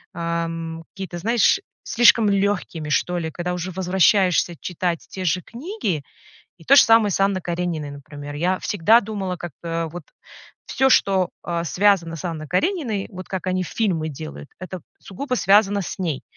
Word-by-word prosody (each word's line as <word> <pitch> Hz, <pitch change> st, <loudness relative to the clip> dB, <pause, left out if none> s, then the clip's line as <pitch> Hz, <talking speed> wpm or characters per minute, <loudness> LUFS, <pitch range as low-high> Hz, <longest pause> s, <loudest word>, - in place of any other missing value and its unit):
эм, 165 Hz, -1 st, -3 dB
какие-то, 190 Hz, -3 st, -6 dB
знаешь, 230 Hz, -, +3 dB, 0.2 s
слишком 230 Hz, -2 st, +5 dB
лёгкими, 195 Hz, -6 st, -1 dB
что 180 Hz, +4 st, +1 dB
ли, 160 Hz, -2 st, -3 dB
когда 180 Hz, +2 st, -3 dB
уже 180 Hz, +1 st, -4 dB
возвращаешься 185 Hz, -1 st, +2 dB
читать 175 Hz, -1 st, -2 dB
те 185 Hz, -1 st, -5 dB
же 180 Hz, +1 st, +1 dB
книги. 240 Hz, -, -4 dB, 0.5 s
И 165 Hz, -, -17 dB
то 275 Hz, -, +6 dB
же 280 Hz, -, +9 dB
самое 225 Hz, -3 st, +5 dB
с -, -, -1 dB
Анной 195 Hz, -1 st, +2 dB
Карениной, 170 Hz, -4 st, -3 dB
например. 145 Hz, +1 st, -9 dB
Я 180 Hz, +4 st, +1 dB
всегда 210 Hz, +4 st, +4 dB
думала, 195 Hz, -4 st, -4 dB
как-то 165 Hz, 0 st, -4 dB
вот 175 Hz, 0 st, -8 dB, 0.6 s
всё, 265 Hz, 0 st, +2 dB
что, 190 Hz, -7 st, +3 dB, 0.2 s
э, 170 Hz, -1 st, -2 dB
связано 180 Hz, -3 st, +2 dB
с 165 Hz, -, -7 dB
Анной 155 Hz, -3 st, -4 dB
Карениной, 220 Hz, -, -1 dB
вот 185 Hz, 0 st, -8 dB
как 190 Hz, -1 st, -4 dB
они 185 Hz, 0 st, 0 dB
фильмы 170 Hz, -5 st, -1 dB
делают, 75 Hz, -, -8 dB
это 185 Hz, -2 st, -7 dB, 0.2 s
сугубо 250 Hz, +7 st, -4 dB
связано 200 Hz, -1 st, +4 dB
с -, -, -6 dB
ней. 160 Hz, -7 st, -2 dB
180 Hz, 160 wpm, -22 LUFS, 165-200 Hz, 0.6 s, же